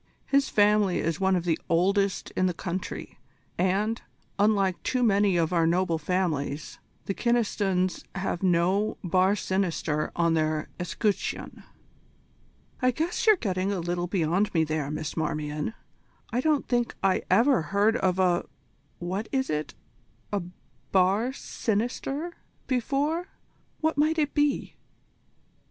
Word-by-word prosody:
His 275 -1 +2
family 205 -2 +3
is 165 0 -1
one 190 -1 +3
of 175 - 0
the 165 -2 +1
oldest 195 +3 +1
in 185 - +1
the 180 - -2
country, 185 +1 -5 0.4
and, 200 +5 0 0.4
unlike 200 -3 +2
too 255 -1 0
many 200 -4 +3
of 165 +1 +1
our 165 -2 +3
noble 170 -1 +1
families, 155 -4 -2 0.3
the 195 - -1
Kynestons 200 -6 0
have 190 -2 -2
no 185 +3 +2
bar 185 +3 +3
sinister 170 -6 -1
on 170 -1 +2
their 155 -1 0
escutcheon." 200 +3 -2 1.2
"I 255 - +4
guess 325 - -1
you're 430 - +8
getting 190 - -1
a 195 - -1
little 175 +1 -2
beyond 180 +2 +1
me 160 - +4
there, 155 -2 -2
Miss 155 0 -4
Marmion. 150 +4 -2 0.6
I 245 - +2
don't 300 0 +1
think 240 -1 0
I 190 -1 +3
ever 230 +2 +4
heard 200 +7 +2
of 185 -4 +1
a 180 -2 +2 0.5
what 185 +5 -4
is 265 - 0
it? 150 0 -3 0.6
a 200 - +1 0.5
bar 195 +6 +3
sinister, 265 +7 -3 0.3
before. 285 - 0 0.5
What 315 -2 +1
might 310 +2 +3
it 295 -2 +1
be?" 290 -2 0
190 Hz, 135 wpm, -27 LUFS, 175-230 Hz, 1.2 s, you're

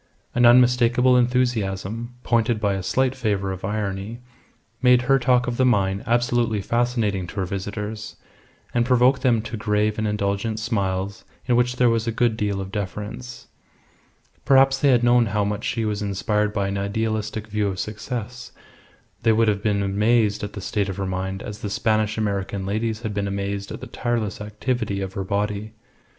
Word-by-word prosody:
An 120 0 +5
unmistakable 125 +1 +5
enthusiasm, 120 -2 0
pointed 115 -1 +1
by 100 -2 +1
a 95 - -2
slight 130 +7 +1
flavour 105 -7 -1
of 95 -1 -7
irony, 105 +2 -3 0.6
made 125 -1 +5
her 135 +2 +3
talk 125 -1 +3
of 120 -1 -3
the 130 - +3
mine 100 -5 +2
absolutely 120 -2 +1
fascinating 115 -4 0
to - - -10
her 95 -3 -1
visitors, 105 +3 -5 0.6
and 120 - +3
provoked 125 +1 +3
them 120 -5 +2
to 115 - -5
grave 105 +1 0
and 110 - 0
indulgent 105 +1 -1
smiles 100 -3 -2 0.2
in 125 - +2
which 125 +1 +2
there 125 -1 +4
was 115 0 0
a - - +1
good 115 0 +1
deal 100 -2 -1
of 95 0 -5
deference. 105 +5 -6 1.0
Perhaps 135 0 +4
had 130 -4 +4
they - - +1
known 120 -1 +4
how 105 0 0
much 105 +1 -3
she 115 -2 -1
was 105 -1 -2
inspired 105 +1 0
by 100 -2 -1
an 100 0 -2
idealistic 110 +1 -2
view 105 -1 -1
of 95 -1 -3
success 115 +2 -5 0.7
they 115 - +4
would 115 +1 +3
have 100 -2 +1
been 100 -1 +1
amazed 105 +2 +2
at 105 - -5
the 100 - -6
state 100 +1 -1
of 95 - -5
her 100 - -2
mind 95 +1 -3
as 105 0 -7
the 105 - -4
Spanish 110 +1 0
American 100 -2 -2
ladies 110 +2 -2
had 110 -2 -3
been 100 0 -1
amazed 100 0 -3
at - - -7
the - - -6
tireless 115 -6 -2
activity 105 0 -2
of 95 -1 -4
her 95 - -3
body. 105 +2 -2
110 Hz, 180 wpm, -23 LUFS, 100-120 Hz, 1.0 s, An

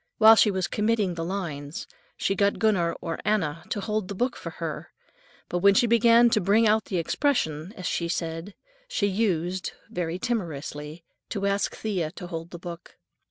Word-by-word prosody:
While 220 0 +9
she 215 - +5
was 190 -2 -1
committing 210 -3 +1
the 165 -1 -4
lines, 165 -5 -4 0.3
she 195 - +1
got 200 +1 +2
Gunner 190 -7 +2
or 165 -2 -4
Anna 170 -7 0
to - - -1
hold 210 -1 -2
the 200 - -5
book 245 +5 0
for - - -6
her, - - -5 0.6
but 175 - -1
when 200 +2 +5
she 240 - +5
began 235 +1 +5
"to 215 - +3
bring 210 +5 +4
out 215 0 +3
the 185 - -2
expression," 165 - 0
as 185 - -7
she 170 - -1
said, 165 +3 -3 0.3
she 355 - 0
used, 185 -3 0 0.2
very 175 -1 -2
timorously, 160 - -4 0.3
to 200 -2 -2
ask 200 0 0
Thea 185 -8 -2
to 185 - -8
hold 165 -1 -6
the 175 - -8
book. 170 0 -9
190 Hz, 180 wpm, -26 LUFS, 170-215 Hz, 0.6 s, While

